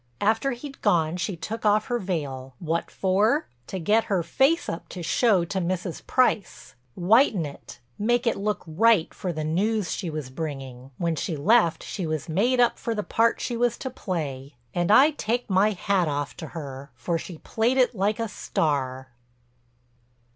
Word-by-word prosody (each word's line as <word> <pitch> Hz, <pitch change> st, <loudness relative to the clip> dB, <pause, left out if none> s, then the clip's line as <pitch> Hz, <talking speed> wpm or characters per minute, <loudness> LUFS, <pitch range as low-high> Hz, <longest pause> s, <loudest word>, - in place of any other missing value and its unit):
After 225 Hz, +6 st, +1 dB
he'd 275 Hz, +3 st, -9 dB
gone 160 Hz, -1 st, +2 dB
she 180 Hz, +2 st, -2 dB
took 225 Hz, +7 st, -5 dB
off 210 Hz, 0 st, +3 dB
her 245 Hz, -2 st, -1 dB
veil—what 155 Hz, -, -3 dB
for? 210 Hz, +10 st, +2 dB, 0.2 s
To 190 Hz, -, -4 dB
get 210 Hz, +6 st, +2 dB
her 190 Hz, -4 st, 0 dB
face 270 Hz, -, +2 dB
up 165 Hz, -, -5 dB
to 180 Hz, -, -7 dB
show 195 Hz, 0 st, +3 dB
to 190 Hz, +3 st, -2 dB
Mrs. 180 Hz, -1 st, -3 dB
Price—whiten 185 Hz, -, +1 dB
it, 140 Hz, -4 st, -10 dB, 0.2 s
make 240 Hz, +4 st, +1 dB
it 230 Hz, -, +2 dB
look 210 Hz, +1 st, -2 dB
right 185 Hz, +2 st, +3 dB
for 185 Hz, -3 st, -3 dB
the 155 Hz, -2 st, -4 dB
news 190 Hz, +4 st, 0 dB
she 180 Hz, -, -3 dB
was 150 Hz, -4 st, -5 dB
bringing. 135 Hz, -4 st, -6 dB
When 170 Hz, -2 st, 0 dB
she 160 Hz, +1 st, -3 dB
left 180 Hz, +2 st, +3 dB
she 185 Hz, -5 st, -4 dB
was 155 Hz, -2 st, -3 dB
made 225 Hz, +10 st, +2 dB
up 240 Hz, -1 st, +3 dB
for 230 Hz, -1 st, -2 dB
the 210 Hz, -, -2 dB
part 230 Hz, +3 st, +2 dB
she 240 Hz, -, -2 dB
was 240 Hz, 0 st, +1 dB
to 260 Hz, -, -5 dB
play. 145 Hz, -, -4 dB, 0.2 s
And 175 Hz, +1 st, 0 dB
I 270 Hz, +8 st, +7 dB
take 245 Hz, -4 st, -2 dB
my 190 Hz, +3 st, +4 dB
hat 190 Hz, -2 st, +1 dB
off 145 Hz, -1 st, -2 dB
to 160 Hz, -, -6 dB
her, 140 Hz, -4 st, -8 dB
for 165 Hz, +8 st, -2 dB
she 170 Hz, 0 st, -8 dB
played 230 Hz, +9 st, 0 dB
it 255 Hz, -1 st, +4 dB
like 205 Hz, +1 st, 0 dB
a 230 Hz, -, -1 dB
star." 130 Hz, -, -2 dB
185 Hz, 175 wpm, -25 LUFS, 155-225 Hz, 0.2 s, I